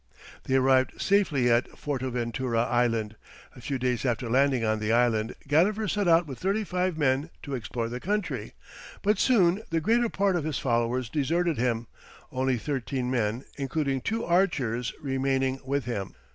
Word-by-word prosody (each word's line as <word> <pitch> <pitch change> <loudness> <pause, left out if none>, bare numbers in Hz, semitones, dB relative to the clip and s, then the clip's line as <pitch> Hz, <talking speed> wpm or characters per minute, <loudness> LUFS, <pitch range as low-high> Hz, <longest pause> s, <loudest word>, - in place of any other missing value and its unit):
They 130 - +1
arrived 130 0 +3
safely 175 -11 +2
at 120 +1 +2
Fortaventura 125 -3 -1
island; 115 -3 0 0.4
a 125 - -12
few 135 +2 -2
days 125 -3 -1
after 120 -2 -1
landing 130 -2 +3
on 110 0 +1
the 105 +1 -1
island, 115 -1 +2
Gadifer 200 +9 +2
set 205 -1 0
out 165 0 +5
with 135 -4 -8
thirty 200 +4 0
five 180 -3 -1
men 140 +1 +1
to 140 - -6
explore 115 -1 -3
the 120 +2 -5
country; 205 +5 -3 0.5
but 210 +1 +2
soon 195 -6 +3
the 165 - +1
greater 230 +8 +2
part 195 -2 +1
of 170 - 0
his 155 -1 -2
followers 120 0 0
deserted 160 +5 0
him, 120 -1 0 0.5
only 130 0 0
thirteen 130 -1 -3
men, 115 0 -1
including 135 -1 -1
two 225 - -2
archers, 135 -10 +1
remaining 135 -1 0
with 135 -1 -1
him. 100 - -4
130 Hz, 160 wpm, -27 LUFS, 120-165 Hz, 0.5 s, out